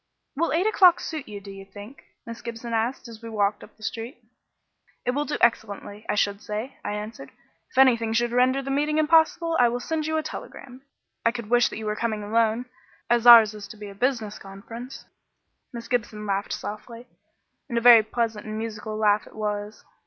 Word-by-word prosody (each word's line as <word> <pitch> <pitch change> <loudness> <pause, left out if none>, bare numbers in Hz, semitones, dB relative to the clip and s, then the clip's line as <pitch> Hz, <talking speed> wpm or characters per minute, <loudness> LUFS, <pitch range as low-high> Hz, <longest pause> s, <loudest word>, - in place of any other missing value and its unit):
"Will 335 +4 0
eight 340 +5 +1
o'clock 370 -5 +5
suit 310 -4 -6
you, 205 -1 -7
do 200 0 -11
you 195 0 -10
think?" 205 +6 -12 0.2
Miss 230 0 -8
Gibson 235 0 -6
asked, 235 +3 -1
as 230 -1 -11
we 230 - -8
walked 205 -1 0
up - - -16
the 215 - -16
street. 230 - -5 0.9
"It 250 - +2
will 290 +3 -1
do - - -3
excellently, 210 -2 -1
I - - +1
should 200 0 0
say," 215 +5 -5
I - - -3
answered. 210 - -7 0.4
"If - - -18
anything 235 -4 +4
should 235 +1 +1
render 255 +2 +2
the 275 - -4
meeting 295 +2 0
impossible 325 +1 +3
I 245 -1 +5
will 240 +1 -3
send 315 +3 -3
you 315 0 0
a 315 - -1
telegram. 255 -3 -9 0.4
I 230 - +3
could 235 -2 -7
wish 245 0 +4
that - - -7
you 220 - -6
were 210 0 -1
coming 215 -2 -2
alone, 225 +2 +1 0.5
as 240 0 +3
ours 225 -3 +9
is 210 -1 -9
to 215 - -12
be 205 -1 -8
a - - -10
business 220 -1 -2
conference." 225 +6 -10 0.7
Miss 235 -2 -8
Gibson 215 -3 -2
laughed 200 0 -2
softly 230 +3 -7 0.6
and 235 - -2
a - - +4
very 235 -1 +8
pleasant 220 -1 -3
and 215 0 -5
musical 215 -1 -5
laugh 210 -1 +2
it - - -16
was. 210 0 -4
230 Hz, 205 wpm, -25 LUFS, 210-250 Hz, 0.9 s, ours